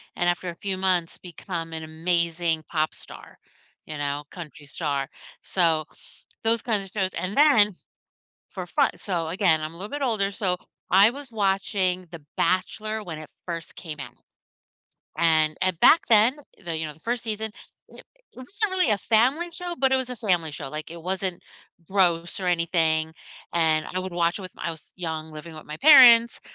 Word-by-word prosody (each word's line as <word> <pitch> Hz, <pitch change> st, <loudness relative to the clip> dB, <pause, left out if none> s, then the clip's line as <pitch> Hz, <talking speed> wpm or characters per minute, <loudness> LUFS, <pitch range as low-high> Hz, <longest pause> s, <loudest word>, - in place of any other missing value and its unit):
and 175 Hz, -, +1 dB
after 175 Hz, +1 st, -2 dB
a 170 Hz, -, -7 dB
few 190 Hz, +2 st, -3 dB
months 185 Hz, -3 st, 0 dB
become 170 Hz, -2 st, -7 dB
an 160 Hz, 0 st, -5 dB
amazing 165 Hz, 0 st, -1 dB
pop 155 Hz, -1 st, 0 dB
star, -, -, -13 dB, 0.5 s
you 155 Hz, -, -6 dB
know, 145 Hz, 0 st, -2 dB
country 150 Hz, -4 st, -10 dB
star." 140 Hz, -3 st, -2 dB, 0.3 s
So, 165 Hz, -4 st, +1 dB, 0.6 s
those 225 Hz, 0 st, +2 dB
kinds 215 Hz, -5 st, -1 dB
of 190 Hz, -, -15 dB
shows, 190 Hz, -3 st, -1 dB
and 185 Hz, +2 st, -3 dB
then 230 Hz, -10 st, +6 dB, 0.8 s
for 185 Hz, -3 st, -6 dB
fu 285 Hz, -, +1 dB
so, 170 Hz, -5 st, -3 dB
again, 170 Hz, -2 st, +2 dB
I'm 155 Hz, +1 st, -5 dB
a -, -, -13 dB
little 195 Hz, +4 st, -7 dB
bit 290 Hz, 0 st, -4 dB
older 215 Hz, -6 st, 0 dB
so, 190 Hz, -2 st, -1 dB, 0.3 s
I 200 Hz, +4 st, +7 dB
was 275 Hz, +1 st, -9 dB
watching 195 Hz, -3 st, 0 dB
The 170 Hz, -3 st, -10 dB
Bachelor 215 Hz, +5 st, -1 dB
when 165 Hz, -4 st, -6 dB
it 155 Hz, -, -11 dB, 0.2 s
first 165 Hz, -2 st, -6 dB
came 155 Hz, -4 st, -7 dB
out. 120 Hz, -3 st, -8 dB, 1.0 s
And 155 Hz, -2 st, +3 dB
and 185 Hz, -3 st, +1 dB
back 335 Hz, -, +7 dB
then 230 Hz, +4 st, +5 dB, 0.3 s
the, 170 Hz, -2 st, -2 dB
you 160 Hz, 0 st, -2 dB
know, -, -, -8 dB
the -, -, -22 dB
1st 240 Hz, +5 st, -2 dB
season, 220 Hz, 0 st, -3 dB, 0.4 s
it -, -, -12 dB, 0.3 s
wasn't 385 Hz, -, -1 dB
really 365 Hz, -9 st, +3 dB
a 210 Hz, -, +3 dB
family 255 Hz, -, +2 dB
show, 350 Hz, 0 st, -5 dB
but 265 Hz, 0 st, +2 dB
it -, -, +5 dB
was 260 Hz, -1 st, -2 dB
a 250 Hz, -, -5 dB
family 180 Hz, -8 st, 0 dB
show, 145 Hz, -, -6 dB
like, 155 Hz, +3 st, -6 dB
it 170 Hz, 0 st, -8 dB
wasn't 185 Hz, 0 st, -2 dB, 0.5 s
gross 175 Hz, -3 st, +1 dB
or 185 Hz, -, -3 dB
anything 160 Hz, -2 st, +1 dB, 0.4 s
and 160 Hz, -2 st, +2 dB
I 185 Hz, -, -1 dB
would 185 Hz, 0 st, -6 dB
watch 170 Hz, +1 st, +1 dB
it -, -, -8 dB
with 185 Hz, -, -10 dB
my -, -, -9 dB
I -, -, -1 dB
was 160 Hz, -2 st, -11 dB
young 160 Hz, -3 st, -4 dB
living 155 Hz, +2 st, -9 dB
with 155 Hz, -, -10 dB
my 150 Hz, -, -6 dB
parents 245 Hz, -6 st, +8 dB
180 Hz, 190 wpm, -25 LUFS, 160-215 Hz, 1.0 s, parents